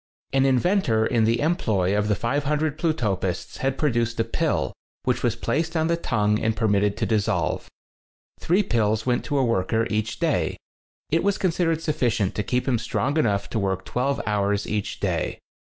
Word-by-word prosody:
An 135 Hz, 0 st, +4 dB
inventor 130 Hz, -, +2 dB
in 115 Hz, -2 st, +2 dB
the 115 Hz, +1 st, +2 dB
employ 110 Hz, -, +1 dB
of 105 Hz, 0 st, +1 dB
the 105 Hz, -, +2 dB
500 145 Hz, +5 st, -1 dB
Plutopists 105 Hz, -, -1 dB
had 135 Hz, 0 st, -1 dB
produced 115 Hz, -6 st, 0 dB
a -, -, +4 dB
pill, 115 Hz, -, -1 dB, 0.3 s
which 125 Hz, -2 st, 0 dB
was 120 Hz, -2 st, +1 dB
placed 160 Hz, +8 st, -1 dB
on 160 Hz, -, +2 dB
the 170 Hz, -, +3 dB
tongue 105 Hz, -9 st, +1 dB
and 110 Hz, -1 st, 0 dB
per 110 Hz, -1 st, +1 dB
mitted 100 Hz, 0 st, +2 dB
to -, -, 0 dB
dissolve. 110 Hz, -3 st, 0 dB, 0.7 s
Three 185 Hz, +5 st, +2 dB
pills 110 Hz, -, +1 dB
went 125 Hz, -1 st, +1 dB
to 145 Hz, -, -1 dB
a 135 Hz, -, +3 dB
worker 115 Hz, 0 st, +1 dB
each 110 Hz, 0 st, -1 dB
day. -, -, 0 dB, 0.5 s
It 165 Hz, -, +2 dB
was 200 Hz, 0 st, +2 dB
con 185 Hz, -, +1 dB
sidered 165 Hz, -2 st, 0 dB
sufficient 120 Hz, -, 0 dB
to -, -, -1 dB
keep 125 Hz, +5 st, -1 dB
him 125 Hz, -4 st, +2 dB
strong 135 Hz, +4 st, -1 dB
enough 100 Hz, -7 st, +1 dB
to 110 Hz, -, 0 dB
work 95 Hz, -1 st, -1 dB
twelve 135 Hz, +3 st, -1 dB
hours 100 Hz, 0 st, 0 dB
each 105 Hz, -1 st, -3 dB
day. -, -, -1 dB
115 Hz, 185 wpm, -24 LUFS, 105-145 Hz, 0.7 s, An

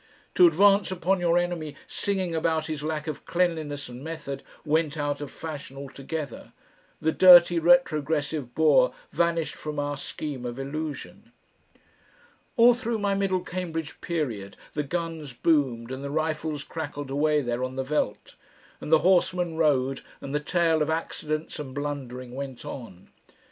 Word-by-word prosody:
To 180 Hz, -, +7 dB
advance 200 Hz, +5 st, +4 dB
upon 185 Hz, +1 st, 0 dB
your 175 Hz, -1 st, +3 dB
enemy 175 Hz, -4 st, -2 dB
singing 190 Hz, -4 st, -2 dB
about 160 Hz, -1 st, 0 dB
his 155 Hz, -2 st, -4 dB
lack 155 Hz, 0 st, -3 dB
of 155 Hz, -3 st, -5 dB
cleanliness 160 Hz, -5 st, -1 dB
and 125 Hz, +2 st, -9 dB
method 145 Hz, -4 st, -5 dB, 0.2 s
went 155 Hz, 0 st, +1 dB
out 145 Hz, -1 st, -2 dB
of 145 Hz, -, -5 dB
fashion 145 Hz, -4 st, -7 dB
altogether! 140 Hz, 0 st, -6 dB, 0.5 s
The 160 Hz, -, +1 dB
dirty 175 Hz, -1 st, +8 dB
retrogressive 155 Hz, -5 st, +2 dB
Boer -, -, +5 dB, 0.2 s
vanished 170 Hz, -1 st, +1 dB
from 150 Hz, -1 st, -6 dB
our 145 Hz, 0 st, -2 dB
scheme 140 Hz, -2 st, -5 dB
of 120 Hz, 0 st, -5 dB
illusion. 155 Hz, -, -6 dB, 1.3 s
All 240 Hz, +1 st, +8 dB
through 235 Hz, -1 st, -2 dB
my 200 Hz, -1 st, 0 dB
middle 195 Hz, -2 st, +1 dB
Cambridge 165 Hz, -4 st, -5 dB
period, 120 Hz, -, -3 dB, 0.2 s
the 150 Hz, -, 0 dB
guns 160 Hz, -2 st, -4 dB
boomed 130 Hz, -5 st, +1 dB
and 130 Hz, +1 st, -5 dB
the 140 Hz, -, -4 dB
rifles 155 Hz, -1 st, -2 dB
crackled 145 Hz, -3 st, -6 dB
away 150 Hz, +1 st, +2 dB
there 120 Hz, -1 st, -2 dB
on 130 Hz, 0 st, -3 dB
the 130 Hz, -, -1 dB
veldt, 130 Hz, -7 st, -2 dB, 0.5 s
and -, -, -6 dB
the 160 Hz, +1 st, +5 dB
horsemen 180 Hz, -2 st, +3 dB
rode 135 Hz, -4 st, +2 dB, 0.2 s
and 140 Hz, -, -7 dB
the 150 Hz, -, +2 dB
tale 165 Hz, +1 st, +2 dB
of 150 Hz, -, +1 dB
accidents 155 Hz, -1 st, -3 dB
and 135 Hz, -3 st, -7 dB
blundering 130 Hz, -4 st, -5 dB
went 135 Hz, -2 st, -6 dB
on. 95 Hz, -8 st, -9 dB
155 Hz, 150 wpm, -26 LUFS, 140-170 Hz, 1.3 s, dirty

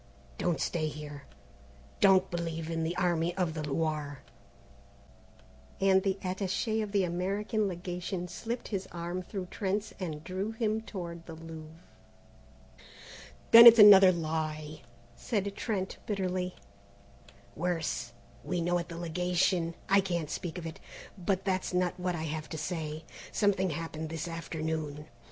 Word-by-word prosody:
Don't 170 Hz, -5 st, 0 dB
stay 155 Hz, +2 st, -1 dB
here, 150 Hz, -2 st, -8 dB, 0.7 s
don't 195 Hz, -2 st, +5 dB
believe 165 Hz, -1 st, -3 dB
in 165 Hz, 0 st, -1 dB
the 165 Hz, +2 st, -2 dB
Army 175 Hz, -1 st, +1 dB
of 175 Hz, -4 st, 0 dB
the 155 Hz, -, -4 dB
Loire:" 150 Hz, -1 st, -2 dB, 1.6 s
and 190 Hz, -1 st, +4 dB
the 195 Hz, 0 st, 0 dB
attaché 195 Hz, +4 st, -1 dB
of 210 Hz, -2 st, -4 dB
the 200 Hz, -2 st, +2 dB
American 200 Hz, +5 st, -1 dB
Legation 180 Hz, 0 st, -4 dB
slipped 235 Hz, +6 st, -5 dB
his 195 Hz, -3 st, -3 dB
arm 175 Hz, +1 st, -4 dB
through 185 Hz, +1 st, -5 dB
Trent's 205 Hz, +2 st, -2 dB
and 155 Hz, -5 st, -4 dB
drew 190 Hz, +5 st, -3 dB
him 220 Hz, -1 st, 0 dB
toward 170 Hz, -6 st, -7 dB
the 165 Hz, -, -7 dB
Louvre. 160 Hz, 0 st, -10 dB, 1.7 s
"Then 230 Hz, +1 st, +12 dB
it's 230 Hz, 0 st, +11 dB
another 200 Hz, -3 st, +10 dB
lie!" 155 Hz, -2 st, -3 dB, 0.3 s
said 200 Hz, -, -2 dB
Trent 195 Hz, -5 st, -3 dB
bitterly. 185 Hz, -3 st, -2 dB, 1.0 s
"Worse 160 Hz, -8 st, -2 dB, 0.3 s
we 180 Hz, -, -2 dB
know 175 Hz, +1 st, +1 dB
at 170 Hz, -, -6 dB
the 170 Hz, -, -7 dB
Legation 175 Hz, 0 st, 0 dB
I 195 Hz, +1 st, +5 dB
can't 170 Hz, -5 st, -2 dB
speak 175 Hz, 0 st, -4 dB
of 175 Hz, -, -6 dB
it. 160 Hz, -, -7 dB, 0.4 s
But 190 Hz, 0 st, -1 dB
that's 185 Hz, -1 st, -1 dB
not 180 Hz, 0 st, 0 dB
what 180 Hz, -1 st, -1 dB
I 160 Hz, -, -4 dB
have 155 Hz, -1 st, -4 dB
to 160 Hz, -, -5 dB
say. 155 Hz, -1 st, -4 dB, 0.3 s
Something 195 Hz, -3 st, +2 dB
happened 160 Hz, 0 st, -4 dB
this 165 Hz, +1 st, -4 dB
afternoon. 160 Hz, -2 st, -4 dB
175 Hz, 140 wpm, -30 LUFS, 160-190 Hz, 1.7 s, Then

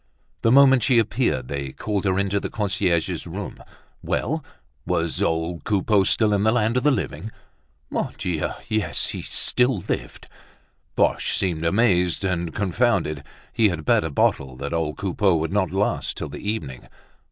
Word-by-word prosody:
The 115 Hz, -, +3 dB
moment 135 Hz, -1 st, +6 dB
she 125 Hz, 0 st, +3 dB
appeared 110 Hz, -, +1 dB
they 70 Hz, -2 st, -4 dB
called 105 Hz, -2 st, -3 dB
her 95 Hz, -1 st, +1 dB
into 100 Hz, 0 st, +1 dB
the -, -, -5 dB
concierge's 95 Hz, -5 st, -1 dB
room. -, -, -7 dB, 0.4 s
Well! -, -, -2 dB, 0.4 s
was 85 Hz, 0 st, -1 dB
old 80 Hz, +1 st, -1 dB
Coupeau 100 Hz, -1 st, +2 dB
still 110 Hz, 0 st, +3 dB
in 100 Hz, -, +2 dB
the 110 Hz, +1 st, +3 dB
land 115 Hz, -1 st, +1 dB
of 125 Hz, -, +2 dB
the 150 Hz, -, +3 dB
living? 110 Hz, -5 st, -2 dB, 0.6 s
Mon -, -, -1 dB
Dieu! 85 Hz, -4 st, -2 dB, 0.2 s
yes, 110 Hz, -3 st, 0 dB
he -, -, -5 dB
still 125 Hz, -1 st, +1 dB
lived. -, -, -4 dB, 0.7 s
Boche -, -, +1 dB
seemed 85 Hz, -4 st, -1 dB
amazed 90 Hz, -1 st, +2 dB
and 85 Hz, -3 st, -1 dB
confounded; 95 Hz, -, 0 dB, 0.3 s
he 110 Hz, -2 st, +4 dB
had 85 Hz, -4 st, -4 dB
bet -, -, +3 dB
a 80 Hz, -, -2 dB
bottle 65 Hz, -2 st, 0 dB
that 70 Hz, +4 st, -5 dB
old 80 Hz, -2 st, -1 dB
Coupeau 95 Hz, -1 st, +1 dB
would 80 Hz, +2 st, -1 dB
not 100 Hz, -4 st, +1 dB
last 95 Hz, +4 st, -1 dB
till -, -, -4 dB
the 100 Hz, -, -5 dB
evening. 70 Hz, -, -5 dB
95 Hz, 165 wpm, -23 LUFS, 80-110 Hz, 0.7 s, moment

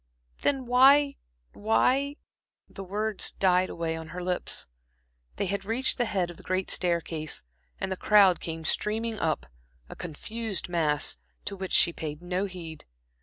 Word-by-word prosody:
"Then 270 Hz, -2 st, +1 dB
why 275 Hz, +3 st, +6 dB, 0.4 s
why" 265 Hz, +6 st, +2 dB, 0.5 s
The 195 Hz, -, -9 dB
words 210 Hz, +2 st, -2 dB
died 185 Hz, -1 st, +3 dB
away 165 Hz, -1 st, -2 dB
on 160 Hz, 0 st, -7 dB
her 180 Hz, +3 st, -6 dB
lips. 180 Hz, 0 st, 0 dB, 0.7 s
They -, -, -1 dB
had 195 Hz, +1 st, -2 dB
reached 235 Hz, +6 st, 0 dB
the 240 Hz, -, +3 dB
head 185 Hz, -5 st, -1 dB
of 170 Hz, -, -13 dB
the -, -, -12 dB
great 185 Hz, 0 st, -1 dB
staircase, 165 Hz, -3 st, -1 dB, 0.4 s
and 190 Hz, -, -2 dB
the -, -, 0 dB
crowd 195 Hz, -2 st, +5 dB
came 165 Hz, -1 st, -5 dB
streaming 220 Hz, +4 st, 0 dB
up, 160 Hz, -1 st, 0 dB, 0.4 s
a -, -, -8 dB
confused 205 Hz, +5 st, -4 dB
mass, 155 Hz, -4 st, +2 dB, 0.3 s
to 200 Hz, -, -2 dB
which 190 Hz, -1 st, -5 dB
she 170 Hz, -, +5 dB
paid 150 Hz, -2 st, -5 dB
no 180 Hz, +2 st, -2 dB
heed. 170 Hz, -5 st, -8 dB
185 Hz, 155 wpm, -28 LUFS, 170-220 Hz, 0.7 s, why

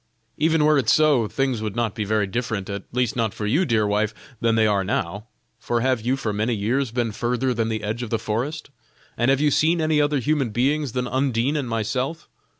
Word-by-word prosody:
even 160 Hz, 0 st, +2 dB
were 150 Hz, -1 st, +4 dB
it 115 Hz, -4 st, 0 dB
so, 145 Hz, -7 st, +4 dB
things 130 Hz, -1 st, -1 dB
would 110 Hz, -1 st, -4 dB
not 115 Hz, -3 st, 0 dB
be 110 Hz, -, -3 dB
very 105 Hz, 0 st, +1 dB
different 105 Hz, -2 st, -3 dB
at 100 Hz, -1 st, -5 dB
least 125 Hz, -2 st, 0 dB
not 115 Hz, -4 st, -1 dB
for 105 Hz, -, -4 dB
you, 145 Hz, -, +2 dB
dear 115 Hz, -6 st, +2 dB
wife 105 Hz, +1 st, 0 dB, 0.2 s
than 115 Hz, -1 st, +2 dB
they 110 Hz, -1 st, +4 dB
now 100 Hz, -3 st, +1 dB, 0.3 s
are. 100 Hz, +1 st, -8 dB, 0.4 s
For 120 Hz, +1 st, -1 dB
have 130 Hz, -2 st, +1 dB
you 125 Hz, +4 st, 0 dB
for 110 Hz, -5 st, -2 dB
many 110 Hz, +3 st, 0 dB
years 120 Hz, +6 st, 0 dB
been 120 Hz, -1 st, -1 dB
further 125 Hz, +4 st, -1 dB
than 115 Hz, -1 st, -1 dB
the 110 Hz, -1 st, -3 dB
edge 110 Hz, +3 st, -3 dB
of 120 Hz, -, -4 dB
the 115 Hz, -, +1 dB
forest? 135 Hz, +9 st, -3 dB, 0.4 s
and 120 Hz, +2 st, +1 dB
have 135 Hz, 0 st, +3 dB
you 150 Hz, 0 st, +3 dB
seen 165 Hz, +4 st, +3 dB
any 155 Hz, -1 st, +2 dB
other 145 Hz, 0 st, +1 dB
human 135 Hz, 0 st, 0 dB
beings 135 Hz, +4 st, 0 dB
than 125 Hz, -1 st, -1 dB
Undine 130 Hz, +1 st, 0 dB
and 140 Hz, -5 st, -2 dB
myself? 125 Hz, +8 st, -2 dB
120 Hz, 225 wpm, -23 LUFS, 110-135 Hz, 0.4 s, were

